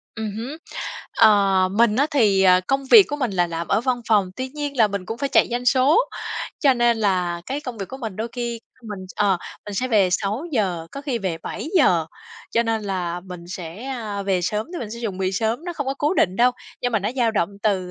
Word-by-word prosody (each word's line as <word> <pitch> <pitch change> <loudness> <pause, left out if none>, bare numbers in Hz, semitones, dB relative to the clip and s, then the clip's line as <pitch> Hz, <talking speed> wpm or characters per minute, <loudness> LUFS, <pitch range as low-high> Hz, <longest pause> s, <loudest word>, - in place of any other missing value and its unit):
Ừm 220 -2 -3
hứm. 250 +8 -5 0.6
Ờ, 200 -4 +5
mình 220 +1 +3
á 280 +3 +3
thì, 210 -10 +3
ờ, 185 -1 +6
công 270 0 0
việc 415 - +9
của 290 - -2
mình 255 -6 -1
là 175 -3 +1
làm 170 0 -5
ở 200 - +2
văn 245 0 0
phòng, 205 -4 +3
tuy 260 0 -3
nhiên 290 0 -5
là 220 -3 +5
mình 200 -2 -4
cũng 225 - -5
phải 280 - -1
chạy - - +4
doanh 245 +1 -2
số, 265 - +5 0.6
cho 275 -3 +5
nên 240 -1 +3
là 180 -5 0
cái 275 +2 -3
công 250 -6 -7
việc 195 - -5
của 265 - -7
mình 225 -7 -6
đôi 225 +2 -3
khi 235 -2 -4 0.2
mình, 210 -3 -7 0.2
ờ, 200 -3 +2 0.3
mình 205 - -6
sẽ 255 +6 -1
về 205 -6 +4
6:00, 200 - -1
có 275 - -6
khi 270 -5 -2
về 185 -6 -3
7:00. 180 - +1 0.4
Cho 235 - +2
nên 225 -1 -1
là 180 -3 -3
mình 180 -1 -9
sẽ, 180 +5 -7
a, 220 -7 -4
về 195 -2 +1
sớm 210 +4 -1
thì 350 - -4
mình 215 -3 -6
sẽ 235 - -7
dùng 210 -6 -4
bị 190 0 0
sớm, 225 - -1
nó 350 - -4
không 285 -4 -4
có 270 - -1
cố 295 +5 +1
định 185 - +2
đâu, 245 +3 +5 0.3
nhưng 245 -1 0
mà 220 - +3
nó 205 +2 -2
dao 240 -3 +2
động 200 -6 0
từ, 185 -4 0
220 Hz, 240 wpm, -22 LUFS, 190-255 Hz, 0.6 s, việc